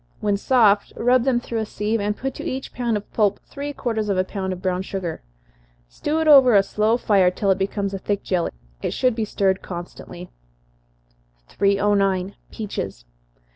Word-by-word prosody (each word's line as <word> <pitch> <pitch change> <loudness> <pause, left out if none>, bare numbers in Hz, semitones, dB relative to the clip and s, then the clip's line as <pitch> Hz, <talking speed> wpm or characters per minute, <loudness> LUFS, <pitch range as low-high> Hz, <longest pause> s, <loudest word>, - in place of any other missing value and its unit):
When 205 -1 +1
soft, 210 -2 +3
rub 245 +1 +3
them 255 -3 +2
through 235 -1 -4
a 220 - -1
sieve, 215 +2 -1
and 210 +1 -1
put 270 0 -3
to - - -8
each 265 +1 -5
pound 235 -3 0
of 205 - -10
pulp 205 -2 +2
three 285 +1 -6
quarters 220 -6 -2
of 195 - +1
a 185 - +3
pound 190 0 -4
of 185 - -5
brown 185 -1 -1
sugar. 190 -3 -5 0.7
Stew 300 - -2
it 320 - 0
over 265 -6 +8
a 195 - +6
slow 215 +3 +1
fire 195 -6 +3
till 195 +2 0
it 190 - +1
becomes 200 0 -2
a 195 - -3
thick 205 +1 -2
jelly. 180 -3 0 0.3
It - - -2
should 255 -1 +2
be 220 -1 -2
stirred 195 -2 0
constantly. 175 0 -8 1.2
309. 200 -1 +1 0.2
_Peaches. 100 - -5
205 Hz, 180 wpm, -22 LUFS, 190-230 Hz, 1.2 s, over